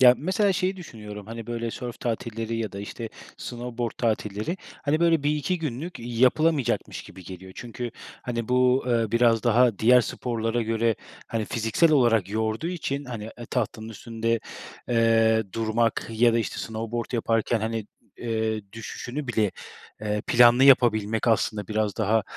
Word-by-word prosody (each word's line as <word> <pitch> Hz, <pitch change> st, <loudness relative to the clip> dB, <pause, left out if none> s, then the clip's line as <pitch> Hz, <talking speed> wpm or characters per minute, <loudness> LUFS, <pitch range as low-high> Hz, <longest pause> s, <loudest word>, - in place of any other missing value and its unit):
Ya, 125 Hz, -1 st, +9 dB
mesela 190 Hz, +5 st, +2 dB
şeyi 185 Hz, +1 st, 0 dB
düşünüyorum: 105 Hz, -, -9 dB
Hani 115 Hz, 0 st, -7 dB
böyle 115 Hz, -1 st, -3 dB
sörf 120 Hz, 0 st, -7 dB
tatilleri 115 Hz, -1 st, -3 dB
ya 110 Hz, -3 st, -3 dB
da, 100 Hz, -, -6 dB
işte, 115 Hz, +3 st, -6 dB, 0.3 s
snowboard 120 Hz, -1 st, -4 dB
tatilleri, 110 Hz, -, -1 dB, 0.3 s
hani, 150 Hz, +2 st, +1 dB
böyle, 165 Hz, -3 st, +4 dB
1-2 150 Hz, +4 st, 0 dB
günlük 155 Hz, +2 st, -4 dB
yapılamayacakmış 130 Hz, +5 st, +1 dB
gibi 95 Hz, 0 st, -13 dB
geliyor. 95 Hz, +1 st, -9 dB
Çünkü, 120 Hz, 0 st, -6 dB, 0.3 s
hani, 115 Hz, -2 st, -3 dB
bu, 125 Hz, +1 st, +3 dB
ııı, 115 Hz, -3 st, +1 dB
biraz 115 Hz, -1 st, +4 dB
daha 120 Hz, -2 st, +4 dB
diğer 125 Hz, +3 st, +6 dB
sporlara 115 Hz, -1 st, -2 dB
göre, 115 Hz, 0 st, +1 dB, 0.3 s
hani, 115 Hz, -1 st, -2 dB
fiziksel 115 Hz, +9 st, +2 dB
olarak 115 Hz, -8 st, +4 dB
yorduğu 110 Hz, +8 st, -1 dB
için, 145 Hz, -5 st, -3 dB
hani, 120 Hz, -5 st, -6 dB
eee, 120 Hz, -, -8 dB
tahtanın 110 Hz, 0 st, -2 dB
üstünde, 115 Hz, +1 st, -2 dB, 0.5 s
eee, 115 Hz, -1 st, +4 dB
durmak 115 Hz, 0 st, 0 dB
ya 115 Hz, +1 st, +4 dB
da, 115 Hz, -, +2 dB
işte, 115 Hz, -, -3 dB
snowboard 115 Hz, +1 st, -4 dB
yaparken, 115 Hz, -1 st, +1 dB
hani, 110 Hz, -1 st, -2 dB, 0.3 s
eee, 110 Hz, -2 st, -1 dB
düşüşünü 120 Hz, +5 st, -6 dB
bile, 110 Hz, -4 st, +1 dB, 0.5 s
eee, 105 Hz, -1 st, -2 dB
planlı 120 Hz, +2 st, +6 dB
yapabilmek 115 Hz, -4 st, +4 dB
aslında 110 Hz, -2 st, +1 dB
biraz 105 Hz, -1 st, -1 dB
daha, 110 Hz, 0 st, +2 dB
115 Hz, 150 wpm, -26 LUFS, 110-125 Hz, 0.5 s, Ya